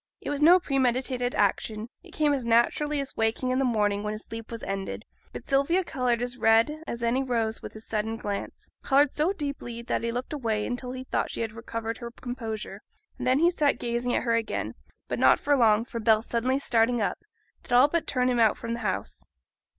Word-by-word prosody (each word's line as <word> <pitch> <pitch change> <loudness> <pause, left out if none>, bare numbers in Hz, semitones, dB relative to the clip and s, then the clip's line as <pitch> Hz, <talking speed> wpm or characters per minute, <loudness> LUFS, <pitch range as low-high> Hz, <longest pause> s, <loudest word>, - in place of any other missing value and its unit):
It - - -5
was 290 0 -3
no 345 +4 +8
premeditated 255 -4 0
action; 210 +2 0
it - - -16
came 300 -2 +1
as 270 -3 -1
naturally 240 +6 +2
as 275 -1 -5
wakening 225 +3 0
in 255 - +1
the - - +2
morning 210 -4 +1
when 210 0 -3
his 215 - -7
sleep 225 0 -7
was 230 -1 -7
ended; 195 0 -4 0.3
but - - -9
Sylvia 280 +7 +2
coloured 245 -6 0
as 245 0 -3
red 225 +8 +3
as 235 0 -4
any 240 +3 +2
rose 230 -4 -1
at - - -6
his 220 0 -10
sudden 220 +1 -2
glance, 205 -2 -5
coloured 280 +1 +3
so 310 +5 +1
deeply 280 -9 -5
that - - -1
he 230 - -1
looked 245 +5 -4
away 225 -7 -1
until 250 0 -4
he 255 0 -6
thought - - -1
she - - -4
had 225 -1 -3
recovered 230 0 -5
her 235 -1 -6
composure, 225 -5 -6 0.4
and 250 - -3
then 255 +1 +4
he 340 +4 +4
sat 295 -7 +1
gazing 240 +1 -1
at - - 0
her 235 -1 +1
again. 230 -1 -1 0.3
But - - -3
not - - +5
for 290 0 +2
long, 225 -3 +4
for 235 -2 -5
Bell 220 0 +3
suddenly 240 +3 0
starting 240 -3 +2
up, 205 - -1 0.4
did - - -16
all 250 +3 +7
but 335 +1 -1
turn 250 -2 +1
him 245 -1 +1
out 220 -2 +3
of 230 0 -2
the 235 - -4
house. 195 -5 -3
240 Hz, 220 wpm, -27 LUFS, 225-270 Hz, 0.4 s, no